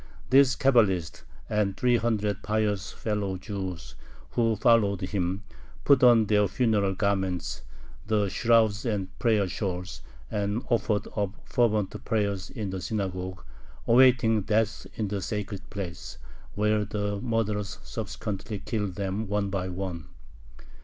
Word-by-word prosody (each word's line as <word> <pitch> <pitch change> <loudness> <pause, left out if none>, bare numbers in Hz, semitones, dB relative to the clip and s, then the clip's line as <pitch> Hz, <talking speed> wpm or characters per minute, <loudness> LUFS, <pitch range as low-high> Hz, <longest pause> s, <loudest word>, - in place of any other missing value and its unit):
This 135 -1 +6
Cabalist, 100 - +2 0.2
and 105 -2 0
three 125 -1 +3
hundred 105 -3 0
pious 105 -2 -1
fellow 105 -3 -2
Jews 90 - -6 0.4
who 115 -2 +2
followed 105 -3 +3
him, 95 0 -2 0.4
put 140 -3 +5
on 120 -3 +6
their 105 -1 +3
funeral 105 -3 +1
garments, 95 - -1 0.5
the 105 -2 +2
shrouds 110 0 +3
and 100 -6 -2
prayer 110 -4 +2
shawls, 90 - -4 0.3
and 105 +3 -1
offered 110 -3 +1
up 100 -1 -1
fervent 110 -5 0
prayers 100 -4 -1
in 105 -7 -4
the 95 -1 -4
synagogue, 95 -2 -3 0.4
awaiting 120 -3 +5
death 110 +1 0
in 110 - -2
the 100 0 -3
sacred 100 -1 -4
place, 95 -4 -6 0.4
where 105 0 +2
the 105 -1 -3
murderers 105 -4 -1
subsequently 105 -1 -5
killed 100 -2 -3
them 100 +2 -2
one 100 0 -1
by 95 -1 -2
one. 90 -3 -5
105 Hz, 125 wpm, -27 LUFS, 95-110 Hz, 0.5 s, This